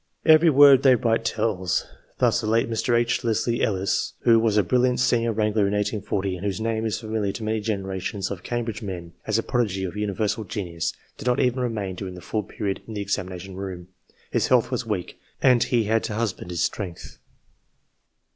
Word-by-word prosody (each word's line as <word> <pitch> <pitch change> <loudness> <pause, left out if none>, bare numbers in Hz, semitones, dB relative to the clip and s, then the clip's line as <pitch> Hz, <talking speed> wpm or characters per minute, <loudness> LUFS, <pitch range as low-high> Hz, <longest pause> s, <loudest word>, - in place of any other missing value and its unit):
Every 160 +1 +7
word 140 -2 +7
they 130 -2 +6
write 115 -1 +1
tells. 105 -6 0 0.3
Thus, 120 - +2
the 110 - -3
late 115 +1 +2
Mr. 115 +1 +1
H. 120 +1 0
Leslie 115 +1 0
Ellis, 95 -2 0
who 115 -1 +5
was 110 -2 +2
a 105 - +5
brilliant 125 +6 +2
senior 120 -2 +2
wrangler 105 -1 +1
in 100 - -1
1840, 100 -2 -1
and 90 - -9
whose 100 0 -2
name 110 0 -1
is 110 - -2
familiar 110 -3 -2
to 115 - -6
many 110 +1 0
generations 100 -1 -3
of 95 -4 -5
Cambridge 120 -3 -3
men 90 -5 -6
as 110 0 +2
a 115 - 0
prodigy 105 -6 -1
of 95 +1 -4
universal 105 +1 -1
genius, 90 -5 -3 0.3
did - - -6
not 125 +1 +2
even 125 0 +1
remain 110 -6 -2
during 90 0 -6
the 90 - -10
full 110 - -2
period 100 -3 -4
in 110 - -7
the 105 - -2
examination 95 -1 -4
room: 90 -2 -6 0.4
his - - +1
health 125 -1 +3
was 125 -2 -2
weak, 100 -5 -4 0.2
and 125 -2 +4
he 120 -2 +2
had 110 +1 +1
to 105 - -4
husband 110 -5 -3
his 85 -1 -1
strength. 90 -5 -5
110 Hz, 195 wpm, -24 LUFS, 95-115 Hz, 0.4 s, Every